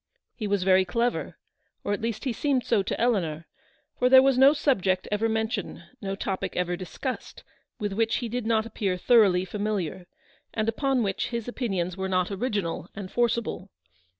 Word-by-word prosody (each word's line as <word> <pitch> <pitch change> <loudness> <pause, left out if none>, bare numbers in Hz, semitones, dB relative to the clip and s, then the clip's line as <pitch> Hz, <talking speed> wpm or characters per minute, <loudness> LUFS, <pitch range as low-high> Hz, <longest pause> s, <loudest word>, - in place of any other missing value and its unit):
He 215 - -4
was 200 -2 +1
very 190 0 +5
clever, 235 +6 -1 0.5
or 205 - -1
at 205 - -3
least 225 -1 -3
he 260 - -1
seemed 265 0 0
so 225 -4 +2
to 190 - -3
Eleanor; 170 -10 0 0.5
for 250 - +4
there 260 0 +9
was 270 -1 +4
no 265 +2 +7
subject 195 -11 +1
ever 215 +2 +1
mentioned, 220 -5 -2 0.2
no 195 -1 -3
topic 195 -1 -3
ever 180 0 0
discussed, 195 +8 -6 0.3
with 205 -4 -3
which 225 +2 +1
he 240 - -2
did 235 0 -3
not 220 -1 +2
appear 200 -5 -2
thoroughly 195 -4 +4
familiar, 190 -3 -3 0.5
and 220 -1 0
upon 260 +2 +1
which 195 -2 -1
his 235 -2 -4
opinions 195 -8 -2
were 190 0 -2
not 185 0 +1
original 200 -5 -2
and 195 -2 -7
forcible. 235 -5 -1
210 Hz, 175 wpm, -26 LUFS, 190-240 Hz, 0.5 s, there